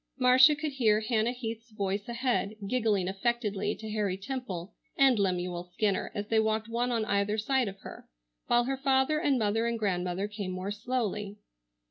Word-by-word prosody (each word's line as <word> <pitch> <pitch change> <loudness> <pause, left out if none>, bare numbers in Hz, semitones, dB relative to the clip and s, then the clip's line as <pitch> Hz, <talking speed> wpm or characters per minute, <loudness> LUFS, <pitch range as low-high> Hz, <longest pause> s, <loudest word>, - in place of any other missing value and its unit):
Marcia 255 +3 +6
could 305 0 -3
hear 225 -6 +3
Hannah 220 +1 +1
Heath's 230 -2 -6
voice 200 0 -3
ahead 235 -3 -1
giggling 210 -4 +1
affectedly 210 0 -1
to 220 -1 -7
Harry 205 -3 -1
Temple 195 -5 -5 0.2
and 265 -5 +5
Lemuel 180 -2 -1
Skinner, 190 +3 -1
as 205 - -2
they 220 +1 +2
walked 220 0 0
one 235 +2 -1
on 225 -2 0
either 200 +1 0
side 255 +2 +1
of 195 0 -7
her, - - -10 0.4
while 240 0 +4
her 270 +2 -2
father 270 +2 +2
and 285 -5 +2
mother 225 +1 +1
and 235 0 -1
grandmother 185 -2 -1
came 210 -2 -5
more 185 +2 -4
slowly. 210 -2 -3
220 Hz, 170 wpm, -29 LUFS, 200-245 Hz, 0.4 s, Marcia